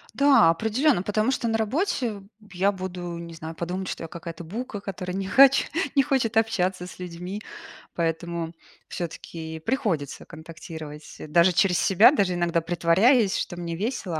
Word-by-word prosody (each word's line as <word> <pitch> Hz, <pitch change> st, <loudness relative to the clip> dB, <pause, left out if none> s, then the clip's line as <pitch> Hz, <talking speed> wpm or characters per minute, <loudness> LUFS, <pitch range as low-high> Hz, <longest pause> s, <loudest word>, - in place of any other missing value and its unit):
Да, 280 Hz, -12 st, +6 dB
определённо, 220 Hz, -, +2 dB
потому 215 Hz, +5 st, +1 dB
что 240 Hz, -, -1 dB
на 225 Hz, 0 st, +1 dB
работе 240 Hz, -, -1 dB, 0.2 s
б 210 Hz, -, -20 dB
я 195 Hz, +3 st, +2 dB
буду, 180 Hz, -2 st, -6 dB
не 170 Hz, 0 st, -8 dB
знаю, 160 Hz, 0 st, -8 dB
подумают, 180 Hz, +3 st, -4 dB
что -, -, -5 dB
я -, -, -5 dB
какая-то 170 Hz, -1 st, -8 dB
бука, 205 Hz, +3 st, -6 dB
которая 180 Hz, -2 st, -5 dB
не 195 Hz, 0 st, -3 dB
хоч 275 Hz, +4 st, +6 dB, 0.3 s
не 275 Hz, -, +5 dB
хочет 265 Hz, -6 st, 0 dB
общаться 190 Hz, -5 st, +1 dB
с 180 Hz, -, -12 dB
людьми. 180 Hz, +3 st, -6 dB, 0.5 s
Поэтому 165 Hz, 0 st, -2 dB, 0.3 s
всё-таки 160 Hz, -1 st, -6 dB
приходится 175 Hz, -, -2 dB
контактировать, 160 Hz, -2 st, -10 dB
даже 170 Hz, +4 st, +4 dB
через 180 Hz, 0 st, +3 dB
себя, 200 Hz, +7 st, +6 dB
даже 195 Hz, -10 st, +1 dB
иногда 170 Hz, -1 st, +1 dB
притворяясь, 190 Hz, -, +3 dB
что 175 Hz, -, -4 dB
мне 170 Hz, -1 st, -4 dB
весело, 195 Hz, -4 st, -3 dB
180 Hz, 155 wpm, -25 LUFS, 170-220 Hz, 0.5 s, Да